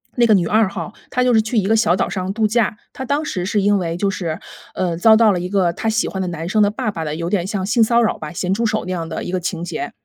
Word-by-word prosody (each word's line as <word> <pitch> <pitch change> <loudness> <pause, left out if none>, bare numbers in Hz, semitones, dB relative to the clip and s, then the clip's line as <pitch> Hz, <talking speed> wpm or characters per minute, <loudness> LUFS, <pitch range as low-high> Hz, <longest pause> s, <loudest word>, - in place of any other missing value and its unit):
那 240 - +4
个 220 - +5
女 180 -4 +2
二 215 0 +3
号， 210 - -6 0.2
她 250 - 0
就 250 -1 +3
是 220 - +5
去 220 +2 -3
一 205 - +2
个 220 - +3
小 215 -6 +3
岛 - - 0
上 185 0 -3
度 220 0 +1
假。 215 -1 0 0.2
她 265 - -6
当 285 +4 -1
时 180 -10 -3
是 205 +1 0
因 205 +1 +3
为 170 -3 -2
就 200 +2 0
是， 170 -4 -3 0.4
呃， 180 -2 -1
遭 220 +5 +6
到 225 -2 +5
了 180 - -1
一 180 +1 -4
个 185 -3 +1
她 225 - -2
喜 220 0 +1
欢 190 - -4
的 185 - -2
男 165 -1 -5
生 215 +2 +2
的 205 - +3
爸 215 0 -2
爸 165 -5 -5
的， 150 -1 -3
有 170 +1 -3
点 185 -3 0
像 195 -2 -2
性 225 +3 +3
骚 235 +2 +3
扰 220 - 0
吧， - - -7
咸 180 +1 -2
猪 230 +4 0
手 215 -1 -1
那 185 - -4
样 165 -2 -4
的 160 - -4
一 - - -5
个 185 - +1
情 170 -1 -3
节。 230 +7 -4
200 Hz, 340 characters per minute, -19 LUFS, 175-220 Hz, 0.4 s, 遭